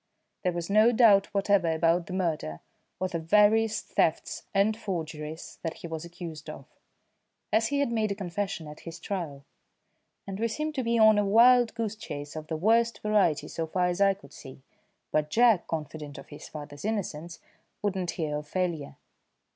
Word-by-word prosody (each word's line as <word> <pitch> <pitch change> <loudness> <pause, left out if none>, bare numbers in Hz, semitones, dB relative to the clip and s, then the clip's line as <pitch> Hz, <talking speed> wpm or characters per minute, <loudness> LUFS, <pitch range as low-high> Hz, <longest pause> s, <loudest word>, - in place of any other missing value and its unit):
There 180 - +1
was 170 -1 -4
no 215 +3 +5
doubt 220 -5 +5
whatever 200 -4 +2
about 165 +1 +2
the 185 - -6
murder, 160 - -2 0.4
or 185 - 0
the 175 -2 -3
various 210 +5 +3
thefts 160 - -1
and 205 +2 +2
forgeries 160 -6 -6
that 165 -1 -4
he - - -8
was 160 -1 -5
accused 170 -2 -8
of, - - -9 0.9
as 225 +1 +3
he 285 0 0
had 280 - 0
made 220 -3 0
a - - -1
confession 195 -2 -4
at 150 0 -10
his 165 0 -9
trial, 160 -8 -5 0.8
and 195 0 -6
we 230 - +1
seemed 305 +7 -3
to 265 -3 -2
be 235 0 +1
on 220 -1 +6
a - - +2
wild 235 +4 +5
goose 225 -2 -2
chase 145 -9 -7
of 155 -1 -6
the 160 - -3
worst 230 +6 +3
variety 205 -8 +2
so 165 -1 -4
far 180 +2 0
as 175 +2 -2
I 195 -1 +5
could 195 - -17
see; 130 0 -12 0.5
but 150 0 +1
Jack, 230 -2 +4
confident 150 -2 -5
of 140 - -11
his 145 - -10
father's 145 -2 -9
innocence, 175 -6 -3 0.5
would 205 -2 0
not 180 -2 -2
hear 155 -5 -2
of 150 0 -7
failure. 170 -4 -2
185 Hz, 185 wpm, -28 LUFS, 160-215 Hz, 0.9 s, on